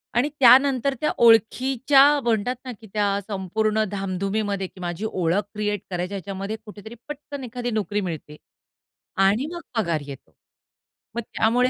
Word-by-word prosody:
आणि 255 Hz, +5 st, +2 dB
त्यानंतर 265 Hz, +1 st, +6 dB
त्या 305 Hz, -, +1 dB
ओळखीच्या 255 Hz, +4 st, +4 dB, 0.2 s
म्हणतात 235 Hz, +2 st, 0 dB
ना 255 Hz, -, -5 dB
की 220 Hz, -, -12 dB
त्या 205 Hz, -1 st, +1 dB
संपूर्ण 215 Hz, +2 st, 0 dB
धामधुमीमध्ये 195 Hz, 0 st, -2 dB
की 185 Hz, -, -18 dB
माझी 175 Hz, +4 st, -4 dB
ओळख 180 Hz, +2 st, +1 dB
क्रिएट 210 Hz, -2 st, -2 dB
करायची 180 Hz, +1 st, -3 dB
ह्याच्यामध्ये 195 Hz, +2 st, -4 dB
कुठेतरी 215 Hz, +2 st, -10 dB
पटकन 290 Hz, -2 st, -7 dB
एखादी 245 Hz, 0 st, -4 dB
नोकरी 210 Hz, -1 st, -1 dB
मिळते 160 Hz, -5 st, -6 dB, 0.9 s
आणि 220 Hz, +8 st, +1 dB
मग 345 Hz, -, -6 dB, 0.2 s
पगार 170 Hz, -7 st, 0 dB
येतो. 140 Hz, -2 st, -11 dB, 0.8 s
मग 235 Hz, -, -1 dB
त्यामुळे 240 Hz, +3 st, +1 dB
215 Hz, 140 wpm, -23 LUFS, 195-245 Hz, 0.9 s, त्यानंतर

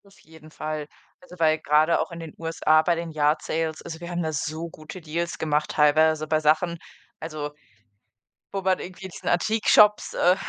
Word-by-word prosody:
Auf 195 Hz, 0 st, -21 dB
jeden 160 Hz, -2 st, -16 dB
Fall. 155 Hz, -1 st, -5 dB, 0.3 s
Also, 270 Hz, -10 st, -14 dB
weil 155 Hz, -1 st, +3 dB
grade 155 Hz, +2 st, +3 dB
auch -, -, -2 dB
in 170 Hz, -, -8 dB
den 165 Hz, -2 st, -8 dB
USA 160 Hz, -1 st, +2 dB
bei 170 Hz, +2 st, +1 dB
den 165 Hz, 0 st, -5 dB
Yard 150 Hz, 0 st, +1 dB
Sales 160 Hz, -1 st, -2 dB
also, 160 Hz, -1 st, -7 dB
wir 170 Hz, 0 st, -8 dB
haben 175 Hz, -1 st, -2 dB
da 160 Hz, 0 st, -2 dB
so 160 Hz, +2 st, -3 dB
gute 155 Hz, +3 st, -10 dB
Deals 170 Hz, +2 st, -3 dB
gemacht, 150 Hz, -1 st, 0 dB
teilweise 155 Hz, +1 st, +3 dB
bei 155 Hz, 0 st, +2 dB
Sachen, 160 Hz, +3 st, +1 dB, 0.4 s
also 155 Hz, -2 st, -5 dB, 1.0 s
wo 195 Hz, -, -1 dB
man 190 Hz, -1 st, +1 dB
irgendwie 185 Hz, +1 st, -8 dB
diesen 185 Hz, -, -6 dB
Antik-Shops 210 Hz, +2 st, +4 dB
äh, 180 Hz, +1 st, +4 dB
160 Hz, 185 wpm, -25 LUFS, 155-170 Hz, 1.0 s, Antik-Shops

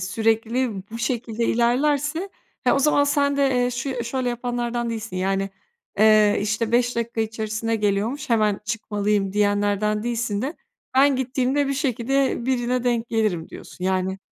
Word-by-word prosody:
sürekli 225 Hz, +5 st, 0 dB, 0.2 s
bu 230 Hz, -, -6 dB
şekilde 235 Hz, 0 st, -2 dB
ilerlerse 290 Hz, +9 st, +1 dB, 0.4 s
he, -, -, +4 dB
o 275 Hz, -, +3 dB
zaman 285 Hz, 0 st, +3 dB
sen 285 Hz, -1 st, +1 dB
de, 280 Hz, -1 st, +3 dB
eee, 245 Hz, -, +1 dB
şu 245 Hz, +3 st, -3 dB
ya 255 Hz, -3 st, -2 dB
şöyle 250 Hz, +1 st, -2 dB
yapanlardan 240 Hz, -1 st, -2 dB
değilsin 220 Hz, -4 st, -5 dB
yani, 195 Hz, +1 st, 0 dB, 0.5 s
eee, 215 Hz, -1 st, +5 dB
işte, 220 Hz, +2 st, -1 dB
5 245 Hz, 0 st, +2 dB
dakika 235 Hz, -1 st, -2 dB
içerisinde 220 Hz, +1 st, -2 dB
geliyormuş 215 Hz, +8 st, -1 dB
hemen 215 Hz, -3 st, +2 dB
çıkmalıyım 210 Hz, -2 st, -1 dB
diyenlerden 205 Hz, +1 st, +1 dB
değilsin 230 Hz, -2 st, -2 dB
de 295 Hz, +6 st, -3 dB, 0.4 s
ben 275 Hz, +1 st, +5 dB
gittiğimde 265 Hz, +2 st, 0 dB
bir 275 Hz, -, 0 dB
şekilde 265 Hz, -2 st, 0 dB
birine 250 Hz, -1 st, 0 dB
denk 235 Hz, -1 st, 0 dB
gelirim 215 Hz, -8 st, 0 dB
diyorsun. 180 Hz, -, -9 dB
Yani 190 Hz, 0 st, 0 dB
235 Hz, 150 wpm, -23 LUFS, 210-255 Hz, 0.5 s, eee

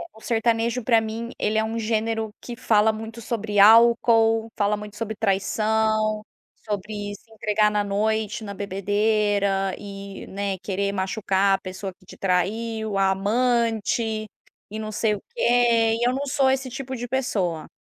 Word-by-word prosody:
o 220 Hz, -, -16 dB
sertanejo 230 Hz, +1 st, 0 dB
para 230 Hz, 0 st, +3 dB
mim, 225 Hz, +1 st, -5 dB
ele 215 Hz, +1 st, 0 dB
é 220 Hz, -, +3 dB
um 220 Hz, +1 st, -3 dB
gênero 225 Hz, 0 st, -1 dB
que 240 Hz, -, -7 dB
fala 220 Hz, -2 st, +3 dB
muito 225 Hz, +1 st, -8 dB
sobre 215 Hz, -3 st, -2 dB
álcool, 225 Hz, +1 st, +5 dB
fala 205 Hz, 0 st, +1 dB
muito 210 Hz, 0 st, -9 dB
sobre 220 Hz, 0 st, -4 dB
traição, 215 Hz, +1 st, +1 dB, 0.4 s
sobre 205 Hz, 0 st, -4 dB
se 215 Hz, -, -19 dB
entregar 210 Hz, 0 st, +2 dB
na 210 Hz, 0 st, 0 dB
noite, 215 Hz, +2 st, -1 dB
na 200 Hz, -, -6 dB
bebedeira 200 Hz, 0 st, 0 dB
e, 200 Hz, -1 st, -8 dB
né, 200 Hz, -1 st, -3 dB
querer 200 Hz, +1 st, -2 dB
machucar 195 Hz, 0 st, +1 dB
a -, -, -26 dB
pessoa 190 Hz, +1 st, -6 dB
que 185 Hz, -, -23 dB
te 200 Hz, -, -12 dB
traiu, 215 Hz, +3 st, -1 dB
a 195 Hz, 0 st, +3 dB
amante 225 Hz, +1 st, 0 dB, 0.5 s
e 215 Hz, -, -5 dB
não 215 Hz, 0 st, -5 dB
sei 215 Hz, 0 st, +1 dB
o -, -, -9 dB
quê, 235 Hz, -, +3 dB
e 240 Hz, -, +2 dB
eu 250 Hz, -, +2 dB
não 275 Hz, +2 st, -2 dB
sou 275 Hz, -1 st, +2 dB
esse 265 Hz, 0 st, 0 dB
tipo 260 Hz, +1 st, -6 dB
de 245 Hz, 0 st, -6 dB
pessoa. 190 Hz, -11 st, -1 dB
215 Hz, 160 wpm, -24 LUFS, 200-230 Hz, 0.5 s, álcool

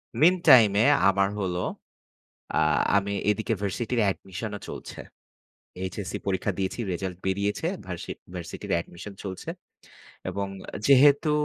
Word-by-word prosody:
Meantime-এ 130 Hz, -, +6 dB, 0.2 s
আমার 100 Hz, 0 st, +2 dB
হলো, 90 Hz, -3 st, -1 dB, 0.9 s
আ -, -, +1 dB, 0.4 s
আমি 100 Hz, 0 st, -1 dB, 0.2 s
এদিকে 110 Hz, +2 st, 0 dB
ভার্সিটির 115 Hz, +5 st, -1 dB
admission 95 Hz, +3 st, -6 dB
-ও -, -, -6 dB
চলছে। -, -, -8 dB, 0.9 s
HSC 100 Hz, -3 st, -5 dB
পরীক্ষা 100 Hz, +1 st, 0 dB
দিয়েছি, 95 Hz, +3 st, -2 dB
result 90 Hz, +1 st, -3 dB
বেরিয়েছে। 100 Hz, +9 st, 0 dB, 0.2 s
ভার্সি 90 Hz, -2 st, -5 dB, 0.2 s
ভার্সিটির 85 Hz, -2 st, -5 dB
admission 90 Hz, +4 st, -10 dB
চলছে। 95 Hz, -2 st, -5 dB, 0.8 s
এবং 100 Hz, 0 st, -2 dB, 0.4 s
যেহেতু 140 Hz, +2 st, +6 dB
100 Hz, 110 wpm, -26 LUFS, 95-115 Hz, 0.9 s, Meantime-এ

